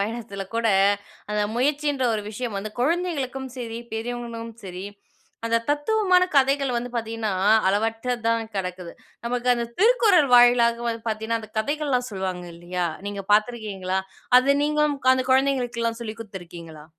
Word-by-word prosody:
பயணத்துல 200 -2 -4
கூட 230 0 +1 0.6
அந்த 210 0 +1
முயற்சின்ற 290 +1 0
ஒரு 210 - -2
விஷயம் 225 -1 -4
வந்து 215 +2 -5
குழந்தைகளுக்கும் 275 -4 -1
சரி, 230 -2 -5
பெரியவங்களும் 230 0 -5
சரி. 185 +1 -6 0.6
அந்தத் 230 0 0
தத்துவமான 365 +4 +3
கதைகள் 275 -1 +3
வந்து 240 +1 -3
பார்த்தீங்கன்னா, 225 -2 -2 0.4
அளவற்றதான் 225 +2 0
கெடக்குது. 180 -2 -4 0.3
நமக்கு 245 +1 0
அந்தத் 235 -1 -3
திருக்குறள் 420 - +5
வாயிலாக 240 -1 +5
வந்து 230 -1 -3
பாத்தீங்கன்னா, 220 +1 -1
அந்தக் 215 0 -13
கதைகள்லாம் 275 0 0
சொல்லுவாங்க 185 -2 -4
இல்லையா? 175 +1 -3 0.2
நீங்கப் 200 -1 -6
பார்த்திருக்கீங்களா? 210 -4 0 0.4
அது 280 +2 +3
நீங்களும் 300 -1 +1
அந்தக் 260 0 0
குழந்தைகளுக்குலாம் 245 -4 +1
சொல்லிக் 220 -1 -6
குடுத்திருக்கீங்களா? 170 -6 -10
235 Hz, 125 wpm, -24 LUFS, 210-265 Hz, 0.6 s, திருக்குறள்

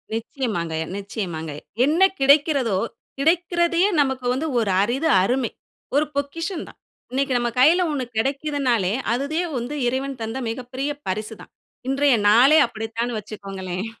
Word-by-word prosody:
நிச்சயமாங்கய்யா 205 - -3
நிச்சயமாங்கய்யா. 170 -7 -5 0.2
என்ன 315 +6 +1 0.2
கிடைக்கிறதோ, 275 - +3 0.4
கிடைக்கிறதையே 345 +3 +2
நமக்கு 265 -2 -1
வந்து 285 +5 -2
ஒரு 215 -4 0
அரிது, 255 +9 0 0.2
அருமை. 245 +2 0 0.4
ஒரு 295 +2 +4
பொக்கிஷந்தான். 320 +5 -4 0.3
இன்னைக்கு 270 +1 0
நம்ம 240 0 0
கையில 325 +8 +6
1 275 -4 -2
கிடைக்கிதுன்னாலே, 265 -5 0 0.2
அதுவே 280 +7 -1 0.2
வந்து 245 +5 -4
இறைவன் 265 +1 -2
தந்த 225 +3 -4
மிகப்பெரிய 255 +4 -4 0.2
பரிசு 215 +4 -3
தான். - - -14 0.4
இன்றைய 275 -1 +3
நாளே 255 +8 +6
அப்படித்தான்னு 230 +1 -4
வச்சுக்கோங்களேன். 195 -3 -6
255 Hz, 120 wpm, -22 LUFS, 220-285 Hz, 0.4 s, கையில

